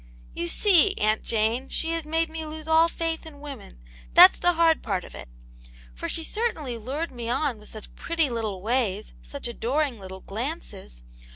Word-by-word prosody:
"^ - - -23 0.3
You 170 - -3
see, 390 - +4
Aunt 215 +1 +1
Jane, 230 +4 -1
she 325 - -2
has 330 -2 -2
made 325 +2 +1
me 320 0 -6
lose 310 0 -8
all 320 +1 +5
faith 330 -1 -3
in 315 -3 -12
women; 275 - -9 0.4
that's - - +9
the 355 - +3
hard 330 -1 +3
part 195 -5 -2
of - - -12
it. - - -10 0.6
For - - -5
she 325 - -2
certainly 315 - -3
lured 280 +9 -4
me 240 -2 -5
on 260 -2 0
with 210 - -15
such 215 -1 -11
pretty 330 -2 0
little 220 -6 -4
ways, 215 -3 -1
such 280 -3 -8
adoring 250 +2 -1
little 190 -1 -9
glances 205 - -6
270 Hz, 185 wpm, -25 LUFS, 215-320 Hz, 0.6 s, that's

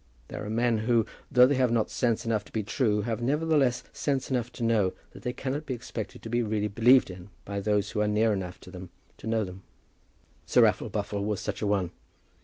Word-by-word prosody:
There - - -6
are 105 - -5
men 115 0 +1
who, 115 0 +2 0.3
though 125 -2 +7
they 140 - +3
have 130 -2 +3
not 115 -2 +1
sense 120 -3 0
enough 110 -3 0
to - - -17
be 110 - -2
true, 105 -1 +1
have 115 +1 -2
nevertheless 145 -1 +2
sense 140 -2 -1
enough 120 -2 -1
to 120 - -5
know 110 -5 +2 0.2
that - - -12
they 125 - -2
cannot 140 +4 -4
expect 120 -3 -5
to - - -9
be 120 +1 +1
really 105 -2 0
believed 115 +2 +5
in 90 +1 -11 0.2
by 100 0 -3
those 105 0 0
who 105 - -1
are 105 - +2
near 105 +1 +2
enough 90 -2 -4
to 90 - -12
them 90 -1 -9 0.3
to - - -8
know 110 -1 +1
them. 95 -1 -8 0.9
Sir - - +5
Raffle - - +2
Buffle 100 -1 -2
was 105 -1 -1
such 105 -1 -4
a 105 - 0
one. 95 -4 0
110 Hz, 220 wpm, -28 LUFS, 105-120 Hz, 0.9 s, though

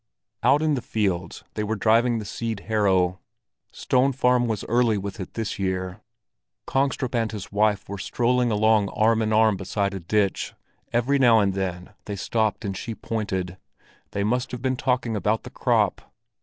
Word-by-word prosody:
Out 140 +6 +4
in 155 -1 +2
the 130 - -1
fields 95 -7 -2
they 105 - -2
were 110 +1 -1
driving 115 +3 +3
the 110 - -5
seed 110 0 -4
harrow; 95 -4 +1 0.5
Stone 130 +2 +1
Farm 125 -1 +2
was 110 -4 -2
early 120 -2 +2
with 100 +1 -5
it 95 - -7
this 110 -3 -3
year. 95 +1 -2 0.6
Kongstrup 135 -2 0
and 115 -2 0
his 105 -3 -7
wife 105 -1 +1
were 100 0 -6
strolling 125 +3 +1
along 110 -1 +3
arm 110 +1 +2
in 110 0 0
arm 110 -2 +4
beside 100 +1 -2
a 95 - -4
ditch; 100 +3 0 0.4
every 125 +4 +2
now 120 -4 +6
and 100 -3 +2
then 90 -2 -4
they 100 - -4
stopped 105 +1 -1
and 100 -1 -3
she 110 +4 -5
pointed: 95 -6 -3 0.5
they 100 - -2
must 125 +5 0
have 125 - -6
been 130 -1 +1
talking 125 -3 0
about 105 +2 0
the - - -10
crop. - - 0
110 Hz, 175 wpm, -24 LUFS, 100-120 Hz, 0.6 s, now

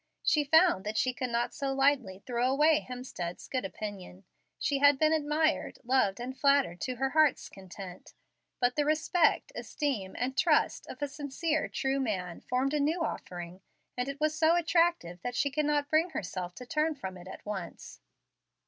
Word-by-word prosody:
She 300 - +3
found 320 - +4
that 210 +1 -3
she 255 - +1
could 250 0 -3
not 235 0 -1
so 275 -1 -2
lightly 265 -9 +1
throw 245 0 0
away 305 +3 +4
Hemstead's 245 -9 -6
good 255 -1 -2
opinion. 195 -2 -7 0.3
She 275 0 0
had 285 0 +6
been 310 +2 +3
admired, 310 +1 0
loved, 240 -6 +2
and 255 +2 -5
flattered 275 - +2
to 255 - -2
her 265 +2 -1
heart's 310 -3 +3
content, 190 -1 -11 0.4
but 245 0 +2
the 295 - +2
respect, 310 +3 +2
esteem, 250 - -3
and 255 +2 -2
trust 305 +4 +2
of - - -7
a - - 0
sincere, 290 +3 -2
true 270 +1 -1
man 185 -9 -3
formed 260 +3 -1
a 300 - +1
new 320 +4 +1
offering, 175 - -6 0.3
and 250 +2 -2
it 280 0 -6
was 310 0 +1
so 320 +1 +4
attractive 335 - +1
that 245 0 -4
she 280 +2 +1
could 300 +2 0
not 295 -1 +1
bring 320 +3 +2
herself 180 - -5
to 250 - -9
turn 305 +4 0
from 190 -8 -6
it 180 0 -11
at - - -10
once. 195 -5 -7
270 Hz, 180 wpm, -30 LUFS, 210-300 Hz, 0.4 s, had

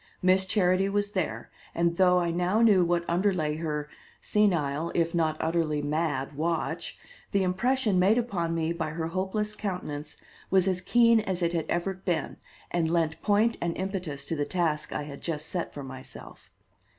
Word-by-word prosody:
Miss 185 +1 +4
Charity 185 0 +2
was 205 0 0
there, 155 - -3 0.2
and, 170 0 +1
though 180 -1 +5
I 175 -1 +1
now 180 +6 +2
knew 200 -5 +6
what 170 0 0
underlay 170 -4 +1
her 150 -2 -3 0.3
senile, 170 -7 +1
if 170 -1 +1
not 160 -2 +1
utterly 160 -3 0
mad 145 -2 -1
watch, 165 +3 -2 0.3
the 200 -1 +2
impression 215 +2 +1
made 200 +5 +4
upon 180 -9 -1
me 165 0 0
by 165 -2 -3
her 160 +1 -3
hopeless 195 +4 -2
countenance 170 -8 -5 0.3
was 190 -1 +3
as 185 -1 0
keen 230 +3 +5
as 190 -4 -2
it 170 0 +1
had 165 -2 -1
ever 175 +3 0
been, 180 -4 -3 0.3
and 165 -2 +1
lent 165 -1 0
point 215 +3 +2
and 170 -1 -1
impetus 185 -7 -4
to 165 - -2
the 145 - 0
task 150 -2 -1
I 150 - -3
had 140 -1 -9
just 155 -2 -3
set 175 -2 -3
for 145 - -7
myself. 130 0 -11
170 Hz, 175 wpm, -28 LUFS, 155-190 Hz, 0.3 s, knew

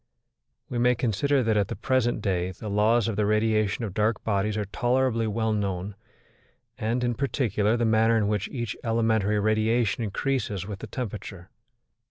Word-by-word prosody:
We 120 - -3
may 125 +1 +4
consider 130 +4 +1
that 110 -1 +1
at 100 -2 +2
the - - -4
present 120 0 0
day 90 -3 0
the 105 +2 -7
laws 110 +2 +3
of 110 -3 -2
the 105 - +2
radiation 110 0 +1
of 100 - -6
dark 105 +1 0
bodies 105 0 0
are 105 - -1
tolerably 120 +3 +1
well 110 +1 0
known, 100 -1 -2 0.8
and, 115 +3 -1
in 120 0 +1
particular, 115 -4 0
the 120 - +1
manner 110 +1 +3
in 105 -2 +1
which 105 -2 -1
each 120 -5 -4
elementary 110 -3 +1
radiation 110 +2 +1
increases 105 -2 -2
with 100 -1 -6
the - - -7
temperature. 100 -6 -6
110 Hz, 170 wpm, -26 LUFS, 105-120 Hz, 0.8 s, may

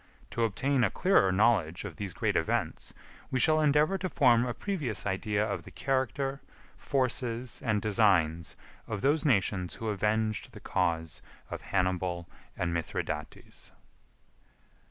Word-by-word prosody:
To 115 - +1
obtain 130 +5 +1
a - - +3
clearer 180 - +3
knowledge 95 -4 +2
of 90 -6 -7
these 100 -2 -4
great - - -1
events, - - -1 0.4
we 130 - -1
shall 155 +3 +4
endeavor 150 +5 +3
to 185 - -2
form 125 -6 +4
a 120 - -2
previous 135 - -3
idea 105 +2 0
of 105 - -3
the - - -12
character, 135 +1 -1 0.3
forces, 125 -2 -1
and 110 -4 0
designs 95 -7 +2 0.3
of 105 -3 -4
those 150 +4 +2
nations 95 - +1
who 115 - -4
avenged 105 +1 -1
the - - -10
cause 80 -2 -1 0.3
of - - -5
Hannibal 90 -2 -1 0.3
and 85 -1 -1
Mithridates. 80 -2 -5
110 Hz, 135 wpm, -29 LUFS, 95-130 Hz, 0.4 s, shall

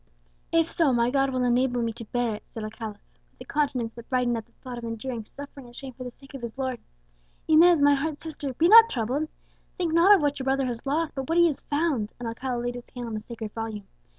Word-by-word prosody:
"If 330 0 +2
so, 320 -5 +3
my 240 0 +2
God 275 0 +2
will 255 -1 -1
enable 245 0 +2
me 230 -1 -1
to 230 - -9
bear 240 0 -1
it," 210 - -8
said 225 - -7
Alcala, 215 -1 -6 0.3
with - - -26
a - - -8
countenance 270 -6 -1
that 235 -1 -12
brightened 250 -2 +1
at 225 0 -5
the - - -31
thought 250 -2 -8
of - - -11
enduring 230 0 -4
suffering 280 +1 -10
and 240 - -15
shame 265 -1 -8
for 255 - -8
the 250 - -5
sake 270 +3 -17
of 270 - -7
his 235 +1 -6
Lord. 260 -2 -2 0.7
"Inez, 320 0 +6
my 285 0 +6
heart's 290 +2 -2
sister, 300 -4 -5
be 330 - +4
not 455 +3 +9
troubled. 260 - -1 0.5
Think 345 -4 -1
not 355 +5 +7
of 355 - 0
what 290 0 0
your 260 - -4
brother 270 0 +1
has 245 +1 -4
lost, 310 +3 0
but 270 0 -5
what 330 - +2
he 345 - +7
has 305 -5 0
found;" 290 -8 -1
and 240 - -5
Alcala 245 +2 -3
laid 245 0 -2
his 245 0 -9
hand 240 -1 -5
on - - -6
the 215 - -3
sacred 220 -1 -7
Volume. 220 -3 -5
255 Hz, 255 wpm, -26 LUFS, 235-290 Hz, 0.7 s, not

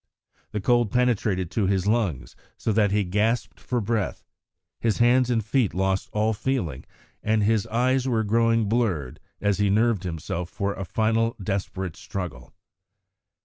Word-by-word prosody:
The 105 - -3
cold 120 +1 +2
penetrated 105 -7 +1
to 105 -4 +1
his 95 -1 +1
lungs, 100 - 0 0.2
so 110 - -1
that 105 -1 +3
he 105 +1 +2
gasped 105 +6 0
for 125 - -2
breath; 110 -2 -2 0.5
his 115 -3 +1
hands 125 +1 +4
and 115 -4 +1
feet 110 -2 +1
lost 95 +1 0
all 110 +1 +1
feeling, 100 - -2 0.4
and 110 -1 +1
his 110 0 +2
eyes 125 +3 +1
were 115 -3 +1
growing 115 +1 +2
blurred 100 - 0 0.2
as 100 -1 +1
he 105 -1 +3
nerved 110 0 +2
himself 85 0 -4
for 100 +2 -2
a 95 - -5
final 115 +3 +1
desperate 95 -3 -3
struggle. 90 - -6
105 Hz, 150 wpm, -25 LUFS, 95-115 Hz, 0.5 s, hands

